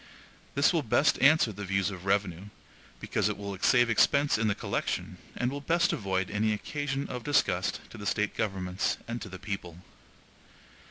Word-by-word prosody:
This 140 +5 +4
will 165 - +2
best 140 +3 +2
answer 145 -3 +5
the 105 0 -7
views 95 +1 0
of 95 -1 -9
revenue, 95 -2 0 0.5
because 105 - 0
it 105 - -3
will 100 -1 -5
save 120 +3 +4
expense 140 +5 +3
in 115 - +1
the 100 - +1
collection, - - -3 0.2
and 125 +1 0
will 140 +1 -5
best 170 +4 +2
avoid 95 -2 -1
any 105 +1 +1
occasion 140 +5 -3
of 125 -1 -6
disgust 95 -11 +1
to 110 - -10
the 100 - -5
State 105 -1 0
governments 95 -2 -1
and 120 +1 -4
to 105 - -7
the 95 - -8
people. 95 -4 -6
105 Hz, 175 wpm, -29 LUFS, 95-130 Hz, 0.5 s, answer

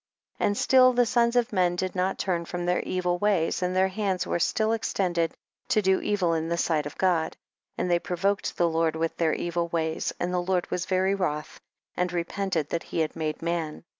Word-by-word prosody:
7. - - +2
And 205 0 0
still 255 -1 +5
the 245 0 +4
sons 235 0 +2
of 240 -3 +1
men 180 -2 +2
did 185 +1 -2
not 185 +1 0
turn 175 -3 -1
from 175 +1 -4
their 180 0 +2
evil 180 -1 -1
ways, 190 -6 +1
and 180 0 -1
their 190 +1 +3
hands 190 -2 -1
were - - -1
still 220 +5 +1
extended 180 -7 -1 0.3
to 215 - +2
do 190 0 +3
evil 185 -5 +1
in 160 0 -1
the 170 - 0
sight 155 -3 0
of 145 - -10
God, 175 -4 +1 0.4
and - - -1
they 175 -1 +3
provoked 195 +4 -1
the 175 - +3
Lord 165 -1 +1
with 165 0 -1
their 160 -2 +2
evil 170 0 -1
ways, 160 -1 -1
and 180 +1 -1
the 180 - +1
Lord 180 0 -1
was 180 +1 -2
very 190 +1 +2
wroth, 150 -6 -3 0.4
and 180 0 0
repented 175 -2 -2
that 170 - -1
he 165 - 0
had 155 - -2
made 155 0 -3
man. 170 -2 -2
180 Hz, 215 wpm, -26 LUFS, 165-190 Hz, 0.4 s, still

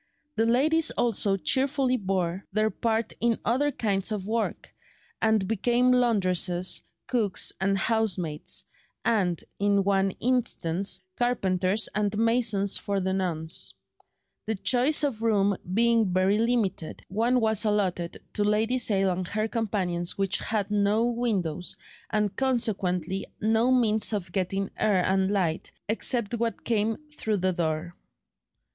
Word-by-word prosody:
The 225 +1 +2
ladies 310 +7 +3
also 205 -4 +1
cheerfully 265 +4 +1
bore 190 -4 -1
their 215 +2 +1
part 225 +2 -1
in 235 -1 +2
other 260 +6 +2
kinds 205 -5 -1
of 205 -3 -3
work, 225 +2 -3 0.5
and 220 -3 +2
became 240 +4 +2
laundresses, 185 -7 +2 0.2
cooks, 220 -7 0
and 195 +1 +2
housemaids, 190 -8 -2 0.4
and, 185 -7 +1 0.2
in 200 0 +2
one 195 0 +2
instance, 205 -7 0 0.2
carpenters 200 -4 +1
and 210 -1 0
masons 225 -3 +2
for 200 -1 -2
the 190 0 -1
nonce. 170 -4 -3 0.7
The 220 - 0
choice 255 +9 +2
of 255 -7 -1
rooms 205 -4 +2
being 230 -1 +3
very 190 +3 +2
limited, 220 -8 -1
one 230 +6 +1
was 220 -2 +2
allotted 190 -5 -1
to 205 - 0
Lady 220 +4 +1
Sale 195 -5 +1
and 180 0 -3
her 215 +3 -1
companions 190 -7 -2
which 195 -1 +1
had 210 -2 -2
no 210 +2 +2
windows, 205 -9 -1 0.3
and 210 -2 0
consequently 195 -8 -1
no 225 +3 +2
means 220 -4 +2
of 185 -4 -3
getting 195 +1 -2
air 195 -4 +2
and 190 0 +1
light, 180 -5 -1 0.2
except 230 +1 +1
what 230 -3 -2
came 220 -1 0
through 220 -8 -2
the 185 0 0
door. 165 0 -2
210 Hz, 130 wpm, -27 LUFS, 190-230 Hz, 0.7 s, ladies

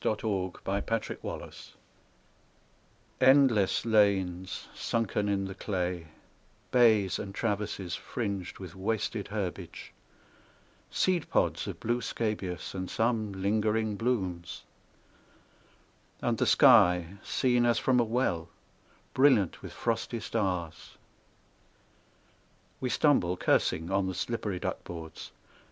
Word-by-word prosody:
Frederic 100 -4 -2
Manning 100 +1 -1
THE 115 - +3
TRENCHES - - -8 1.5
ENDLESS 130 -8 +4
lanes 95 -4 +1
sunken 105 -3 -1
in 100 -1 0
the 95 - -5
clay, 90 -4 -3 0.6
Bays, 110 -6 +4
and 100 -1 -6
traverses, 100 -4 -2
fringed 100 -6 -4
with 95 -3 -9
wasted 105 +1 -2
herbage, 100 -4 -5 1.0
Seed 180 -4 0
pods - - +1
of - - -6
blue 120 +2 -1
scabious, 105 -7 -3
and 95 -1 -4
some 110 -2 0
lingering 105 +2 0
blooms; 95 -7 -2 1.6
And - - 0
the - - +2
sky, 90 +1 +5
seen 125 -2 +2
as 120 -2 +3
from 125 0 +2
a - - +4
well, 110 -8 -1 0.6
Brilliant 130 - +3
with - - -8
frosty 115 0 -2
stars. 95 -7 -3 1.8
We 130 - -2
stumble, 105 - +2
cursing, 80 0 +1
on 95 0 +1
the 95 - -3
slippery 105 -1 -2
duck - - -4
boards. 80 -2 -8
100 Hz, 105 wpm, -29 LUFS, 95-115 Hz, 1.8 s, sky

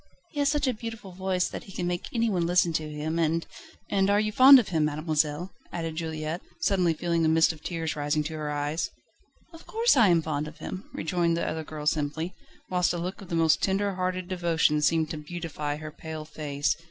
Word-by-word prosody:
He 300 - -5
has 285 -1 +3
such 290 -1 +1
a 255 - +2
beautiful 225 -3 -7
voice 185 0 0
that - - -7
he 195 - -11
can 180 -1 -3
make 175 0 -2
anyone 215 -8 +1
listen 175 -1 +3
to 155 0 -1
him, 155 +2 -2
and 165 0 +1 0.2
..." - - -23
"And 195 -1 +2
you 205 +1 +3
are - - -5
fond 265 +5 +9
of 245 - +1
him, 160 -4 +2
mademoiselle?" 155 +2 -1 0.2
added 165 -2 -4
Juliette, 160 0 -3 0.2
suddenly 180 -4 +2
feeling 170 0 0
a - - +4
mist 160 +1 +4
of 155 - -15
tears 165 -3 -3
rising 150 +1 0
to 155 +2 -5
her 155 -1 -4
eyes. 145 +2 -1 0.6
"Of 330 - -13
course 460 -2 +3
I 235 -5 +6
am 170 -3 +4
fond 150 -1 -2
of 150 - -10
him," 185 - -7
rejoined 170 0 0
the - - -1
other 160 0 -3
girl 155 -1 -7
simply, 155 +3 -1 0.3
whilst 180 -1 +1
a - - -2
look 180 +4 -4
of 190 - -11
the 170 - -1
most 165 -1 +3
tender 200 +1 +1
hearted 185 -1 -2
devotion 170 -4 +1
seemed 160 +1 +2
to 155 - -4
beautify 150 -2 -4
her 155 0 -7
pale 155 0 -7
face. 145 -2 -1
165 Hz, 220 wpm, -27 LUFS, 155-185 Hz, 0.6 s, fond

